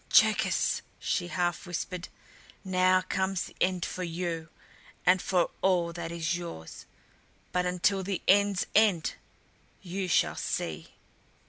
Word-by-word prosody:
"Cherkis!" - - +4 0.2
she 175 - -1
half 175 0 -1
whispered. 180 +1 -4 0.6
"Now 185 0 +4
comes 190 0 -1
the - - -11
end 185 -1 +1
for 185 - -5
you 170 -1 -3 0.6
and 180 +1 +5
for 180 -2 +1
all 175 -3 +2
that 170 -1 -5
is 170 0 -1
yours! 170 - -8 0.6
But 180 0 +1
until 180 +2 +1
the 190 -1 -3
end's 200 0 +4
end 200 -7 +4 0.7
you 185 +1 -3
shall 180 - +2
see." - - -3
180 Hz, 125 wpm, -29 LUFS, 170-190 Hz, 0.7 s, and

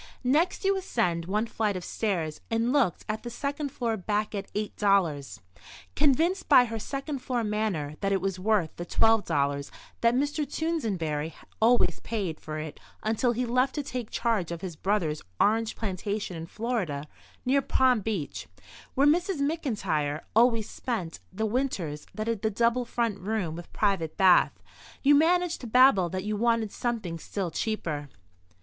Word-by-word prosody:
Next 305 +10 +2
you 390 0 +4
ascended 180 - -1
one 210 +3 +1
flight 215 -3 -1
of 180 - -6
stairs 170 -8 -2
and 230 +3 +1
looked 260 - +2
at 215 0 -2
the 240 - -6
second 285 +4 -3
floor 230 -3 -1
back 210 +3 -1
at 200 -1 -5
$8. 195 -8 +1 0.6
Convinced 320 +7 +2
by 255 -4 +8
her 225 -1 -4
second 275 +4 -4
floor 250 -2 -1
manner 210 -9 -1
that 195 -1 0
it 195 - +2
was 190 0 -2
worth 195 -5 +1
the 175 - -4
$12 145 -12 +2 0.3
that 235 +1 +4
Mr. 285 +4 0
Toosenberry 190 - -2 0.3
always 225 -7 +4
paid 195 -8 -3
for 155 0 -6
it 155 -1 -6 0.2
until 225 +3 +1
he 250 +2 -1
left 255 +3 +1
to 295 - -1
take 250 -4 -5
charge 220 -8 0
of 170 -1 -5
his 180 -4 -5
brother's 170 -4 0 0.2
orange 220 +1 +2
plantation 200 -1 -3
in 165 0 -6
Florida 190 - -2 0.4
near 275 +2 +3
Palm 255 -2 +3
Beach, 200 -7 -3 0.5
where 275 - +4
Mrs. 350 +4 +3
McIntyre 215 - -1
always 230 -2 +4
spent 200 -10 -4
the 220 +4 -2
winters 205 - -2
that 215 - -3
had 230 -3 -1
the 220 - +1
double 235 +3 +1
front 230 -4 -1
room 195 -5 -2
with 175 0 -9
private 190 -7 0
bath, 185 -2 +4 0.4
you 285 +1 +6
managed 345 +3 +3
to 245 - -6
babble 230 -7 +5
that 185 +2 -3
you 210 +1 -1
wanted 230 -1 +1
something 215 -9 -3
still 185 0 -3
cheaper. 155 -8 -2
215 Hz, 160 wpm, -28 LUFS, 180-250 Hz, 0.6 s, by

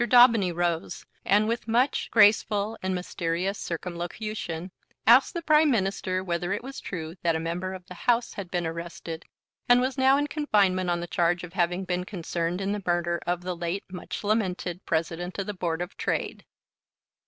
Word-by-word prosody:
Daubeny 235 -5 +6
rose, 170 -1 -2 0.2
and 205 +2 +3
with 230 0 -2
much 245 +5 +1
graceful 210 0 +4
and 185 0 -1
mysterious 180 +2 -2
circumlocution 175 +1 -4 0.3
asked 250 +8 +6
the 340 - -3
Prime 305 0 +5
Minister 190 -5 0
whether 175 0 -2
it 205 - -3
was 270 +1 -7
true 160 -4 -5
that 165 -1 +2
a - - 0
member 175 +3 -3
of 185 -1 -11
the 180 - -10
House 235 +6 +1
had 195 -3 -6
been 175 -1 -1
arrested, 165 0 -6 0.4
and 245 0 +7
was 260 +2 -1
now 265 +1 +5
in 290 - +1
confinement 200 - +1
on 175 0 0
the - - -3
charge 175 +1 +1
of 180 0 -8
having 180 0 0
been 180 0 -1
concerned 175 -1 -3
in 195 +1 -1
the 205 0 -2
murder 175 -1 0
of 175 0 0
the 180 0 -3
late 175 +3 -3
much 180 +3 -6
lamented 190 -4 -1
President 170 +2 -2
of 195 - -2
the 210 - -4
Board 175 -2 -2
of 180 - -10
Trade. - - -2
185 Hz, 180 wpm, -27 LUFS, 175-215 Hz, 0.4 s, and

